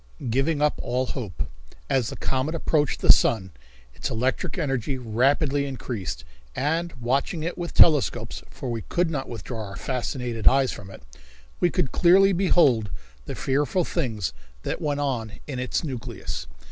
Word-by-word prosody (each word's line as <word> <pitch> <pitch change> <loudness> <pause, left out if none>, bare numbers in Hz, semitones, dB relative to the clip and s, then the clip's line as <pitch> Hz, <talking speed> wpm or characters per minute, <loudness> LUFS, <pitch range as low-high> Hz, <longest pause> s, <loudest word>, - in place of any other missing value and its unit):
Giving 145 +4 +1
Up 150 - +2
All 125 +2 0
Hope. 105 - -4 0.4
As 125 -4 +1
the - - -6
comet 135 +5 -1
approached 150 -3 +1
the - - +9
sun 95 -5 +1 0.4
its - - -4
electric 125 - -1
energy 135 -5 -1
rapidly 135 +5 +1
increased, 120 - -4 0.3
and 165 +4 0
watching 135 +6 -1
it 170 - -2
with 175 -1 -5
telescopes, 125 -7 +4
for 130 - -5
we 115 -1 -2
could 175 +6 0
not 135 -4 -3
withdraw 115 0 -5
our 100 -1 -7
fascinated 125 -2 -3
eyes 135 -1 +5
from 100 -2 -9
it, 95 - -12 0.6
we 175 - +4
could 165 -7 0
clearly 190 +3 +6
behold 150 - +3 0.4
the - - -4
fearful 145 +6 +1
things 115 - -2 0.3
that - - -3
went 145 -1 0
on 120 -6 -2
in 135 -4 -4
its 125 +6 -1
nucleus. 130 -7 -5
135 Hz, 155 wpm, -25 LUFS, 120-150 Hz, 0.6 s, the